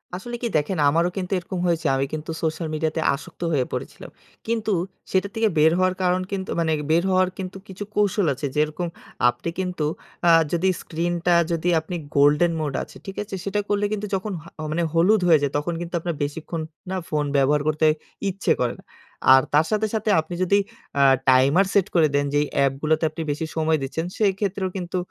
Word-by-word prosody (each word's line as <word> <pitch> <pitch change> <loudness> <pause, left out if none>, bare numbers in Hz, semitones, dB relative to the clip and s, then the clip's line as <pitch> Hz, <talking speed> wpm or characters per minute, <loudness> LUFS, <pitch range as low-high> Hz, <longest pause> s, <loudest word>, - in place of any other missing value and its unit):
আসলে 240 +6 -6
কি 240 - 0
দেখেন 155 +5 -1
আমারও 165 +4 +2
কিন্তু 185 -1 -3
এরকম 185 +1 -5
হয়েছে। 170 -1 0
আমি 135 +1 +1
কিন্তু 155 +1 -4
সোশ্যাল 160 +1 -1
মিডিয়াতে 160 +1 -1
আসক্ত 140 - -12
হয়ে 135 -5 +1
পড়েছিলাম। - - -6 0.4
কিন্তু 220 -2 0 0.4
সেটা 190 +1 +2
থেকে 225 0 +2
বের 155 +1 +6
হওয়ার 185 0 +2
কারণ 180 0 +2
কিন্তু 190 -1 -3
মানে 165 -1 +1 0.2
বের 170 +2 +4
হওয়ার 185 0 +3
কিন্তু 190 0 -6
কিছু 190 +1 -7
কৌশল 205 -1 +2
আছে। 140 +3 -5
যেরকম 155 +3 0 0.4
আপনি 145 - -4
কিন্তু 180 -4 -2 0.4
আ - - +8 0.2
যদি 175 +2 +2
স্ক্রিনটা 175 +1 0 0.2
যদি 170 +1 0
আপনি 160 +3 -6 0.2
গোল্ডেন 150 +4 +4
মোড 145 -3 -2
আছে, - - -14
ঠিক 195 - -8
আছে? 200 - -7
সেটা 200 +1 -1
করলে 205 0 +1
কিন্তু 210 0 -3
যখন 195 +3 -3
হ - - -17 0.3
মানে 170 +2 0
হলুদ 185 +5 +4
হয়ে 160 -3 +6
যায় 140 -1 0
তখন 150 +4 -2
কিন্তু 175 0 -6
আপনার 170 0 -3
বেশিক্ষণ 160 +3 -4 0.3
না 190 - -2
ফোন 150 -1 0
ব্যবহার 140 +2 +3
করতে 155 +1 +2 0.4
ইচ্ছে 195 +2 -1
করে 120 -1 +1
না। - - -35 0.5
আর 135 - +7
তার 150 +2 +5
সাথে, 215 0 +1
সাথে 220 -1 -1
আপনি 160 +3 -9
যদি 200 +2 +3 0.4
অ্যা 140 -1 +4 0.2
টাইমার 135 +9 +5
সেট 200 -1 +3
করে 165 -3 +5
দেন 145 0 +2
যে - - +3
এই - - -4
অ্যাপগুলোতে 140 +3 +1
আপনি 165 - -7
বেশি 150 +3 -3
সময় 160 0 +2
দিচ্ছেন, 160 +5 -3
সেক্ষেত্রেও 195 -2 0
কিন্তু 180 0 -3
170 Hz, 195 wpm, -23 LUFS, 155-190 Hz, 0.5 s, আ